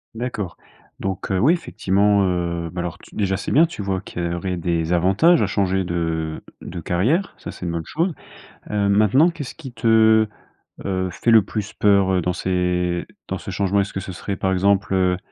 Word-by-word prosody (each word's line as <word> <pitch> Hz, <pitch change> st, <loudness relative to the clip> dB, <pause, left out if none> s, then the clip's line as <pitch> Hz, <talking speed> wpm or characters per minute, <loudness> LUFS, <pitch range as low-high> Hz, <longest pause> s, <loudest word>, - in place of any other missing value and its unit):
D'accord. 110 Hz, -7 st, -4 dB, 0.4 s
Donc 95 Hz, 0 st, -3 dB
heu, 95 Hz, -, +1 dB
oui, 145 Hz, -, +5 dB
effectivement, 100 Hz, -, +1 dB
heu, 85 Hz, -2 st, -1 dB
bah, 90 Hz, -1 st, -4 dB
alors, 90 Hz, -1 st, -5 dB
tu -, -, -17 dB
déjà, 95 Hz, -2 st, 0 dB
c'est -, -, -4 dB
bien, 160 Hz, +4 st, +6 dB
tu 160 Hz, -11 st, -7 dB
vois 95 Hz, -1 st, -1 dB
qu'il 85 Hz, -, -6 dB
y 85 Hz, 0 st, -1 dB
aurait 90 Hz, +1 st, -3 dB
des 85 Hz, 0 st, -1 dB
avantages 95 Hz, -, +4 dB
à 105 Hz, -, +2 dB
changer 95 Hz, -1 st, 0 dB
de 80 Hz, -2 st, -2 dB, 0.2 s
de 90 Hz, -, -7 dB
carrière. 115 Hz, -, 0 dB
Ça, -, -, -8 dB
c'est 90 Hz, -, -8 dB
une 85 Hz, -, -2 dB
bonne 85 Hz, -1 st, -3 dB
chose. 170 Hz, +3 st, -1 dB, 0.6 s
Heu, 105 Hz, -1 st, +1 dB
maintenant, 110 Hz, -, +4 dB
qu'est-ce 145 Hz, -6 st, -7 dB
qui 135 Hz, -6 st, -10 dB
te, 110 Hz, -1 st, +4 dB, 0.6 s
heu, 95 Hz, -1 st, -1 dB
fait 115 Hz, +5 st, 0 dB
le 110 Hz, -, +8 dB
plus 105 Hz, +1 st, -5 dB
peur, 100 Hz, -2 st, +3 dB
heu, 90 Hz, -, +2 dB
dans 90 Hz, +1 st, 0 dB
ces 90 Hz, -1 st, -1 dB, 0.2 s
dans 95 Hz, -, -3 dB
ce -, -, -7 dB
changement? 100 Hz, +1 st, +1 dB
Est-ce 100 Hz, -, -3 dB
que -, -, -4 dB
ce 95 Hz, -1 st, -7 dB
serait, 95 Hz, +2 st, -4 dB
par 95 Hz, 0 st, 0 dB
exemple, 95 Hz, 0 st, +2 dB
heu 90 Hz, -1 st, +2 dB
95 Hz, 205 wpm, -22 LUFS, 90-105 Hz, 0.6 s, le